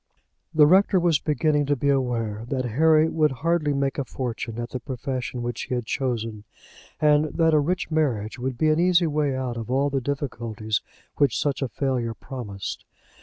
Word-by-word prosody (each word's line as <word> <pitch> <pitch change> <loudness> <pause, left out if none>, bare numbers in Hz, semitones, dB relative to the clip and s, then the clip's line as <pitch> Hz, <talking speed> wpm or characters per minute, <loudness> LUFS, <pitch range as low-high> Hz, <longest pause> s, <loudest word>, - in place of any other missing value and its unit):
The 155 -1 +6
rector 190 +3 +5
was 170 -4 +3
beginning 150 0 +1
to 145 - +2
be 140 +2 0
aware 115 -6 0
that 130 -2 -1
Harry 155 +6 +4
would 155 -2 +2
hardly 165 -3 +2
make 140 0 -1
a - - 0
fortune 120 -3 -5
at 120 0 -5
the 130 - -3
profession 130 -1 -4
which 120 0 -3
he 125 - -2
had 120 -2 -3
chosen, 115 -4 -2 0.6
and 150 0 +4
that 160 +1 +1
a 155 - +5
rich 175 +4 -1
marriage 130 -8 0
would 130 0 -3
be 155 +4 +2
an 155 +1 +3
easy 175 0 +4
way 150 -3 0
out 125 -2 -3
of 115 -1 -6
all 140 +2 +1
the 135 -1 0
difficulties 115 -6 -3 0.4
which 140 -5 +3
such 145 -1 -1
a 135 - -1
failure 125 -5 -1
promised. 105 -8 -6
135 Hz, 185 wpm, -24 LUFS, 120-150 Hz, 0.6 s, The